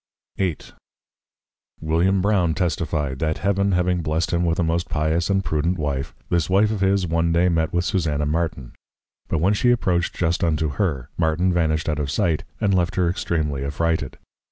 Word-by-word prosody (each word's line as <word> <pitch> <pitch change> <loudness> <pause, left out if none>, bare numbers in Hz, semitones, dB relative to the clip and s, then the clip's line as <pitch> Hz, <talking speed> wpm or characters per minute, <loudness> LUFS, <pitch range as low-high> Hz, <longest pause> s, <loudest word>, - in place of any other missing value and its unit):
VIII. 90 -5 0 1.2
William 85 +5 +1
Brown 95 -6 +2
testifi'd, 75 -5 -1
That 80 -1 -1
Heaven 100 0 +1
having 90 0 +1
blessed 80 +1 -1
him 85 0 +1
with 85 -1 +1
a 90 - +1
most 85 +2 -1
Pious 80 +2 0
and 95 -1 +1
Prudent 85 +4 0
Wife, 70 -3 -3
this 85 -1 0
Wife 100 +3 +3
of 105 -3 -3
his, 95 -1 +2
one 85 0 +1
day 85 +2 +3
met 80 -2 0
with 90 +1 0
Susanna 80 -7 0
Martin; 75 -4 -2 0.6
but - - 0
when 90 +6 +2
she 120 +4 +2
approach'd 90 -8 +1
just 85 0 0
unto 80 -2 +1
her, 70 -4 -2
Martin 85 +3 +2
vanished 80 -2 0
out 75 -1 -1
of 70 -2 -2
sight, 80 +1 0 0.2
and 105 -3 +1
left 90 -2 +1
her 90 -2 +2
extreamly 80 -5 -1
affrighted. 80 0 -1
85 Hz, 180 wpm, -22 LUFS, 80-90 Hz, 1.2 s, Wife